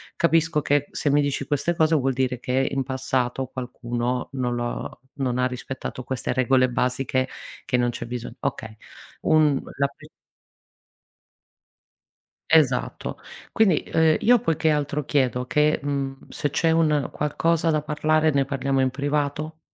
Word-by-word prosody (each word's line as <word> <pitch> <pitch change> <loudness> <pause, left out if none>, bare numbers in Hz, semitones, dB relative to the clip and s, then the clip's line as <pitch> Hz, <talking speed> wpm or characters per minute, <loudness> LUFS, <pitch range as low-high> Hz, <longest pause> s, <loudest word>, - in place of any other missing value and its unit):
capisco 165 -2 +2
che 145 0 +1
se 145 - -1
mi 145 +1 +4
dici 140 -1 -1
queste 150 +4 0
cose 160 0 +3
vuol 135 -2 +1
dire 125 -1 -1
che 130 +2 0
in 135 - 0
passato 130 -1 -1
qualcuno 125 -1 -3
non 125 -2 -1
lo 120 0 -4 0.2
non 125 -3 -1
ha 125 - +3
rispettato 130 0 -6
queste 130 0 -3
regole 130 0 +3
basiche 130 +1 0 0.4
che 125 - +1
non 120 0 +2
c'è 120 - -5
bisogno". 120 0 -6
Okay 110 -1 -4 0.4
un 155 -3 +3 0.2
la 140 - +3
pe 140 - -16 2.4
Esatto. 145 -6 +2 0.3
Quindi, 195 -9 +3
uhm, 160 -1 +4
io 245 +1 +5
poi 165 -5 0
che 160 +1 +1
altro 150 0 0
chiedo 130 -3 0
che 150 +2 +2
mhmm 135 -1 -3
se 145 - -2
c'è 165 +4 +1
un 155 -4 +2
qualcosa 165 +2 +1
da 155 -1 +1
parlare 155 +1 +1
ne 140 -1 +2
parliamo 135 0 0
in 130 -1 +1
privato 145 +3 -2
140 Hz, 150 wpm, -24 LUFS, 130-150 Hz, 2.4 s, io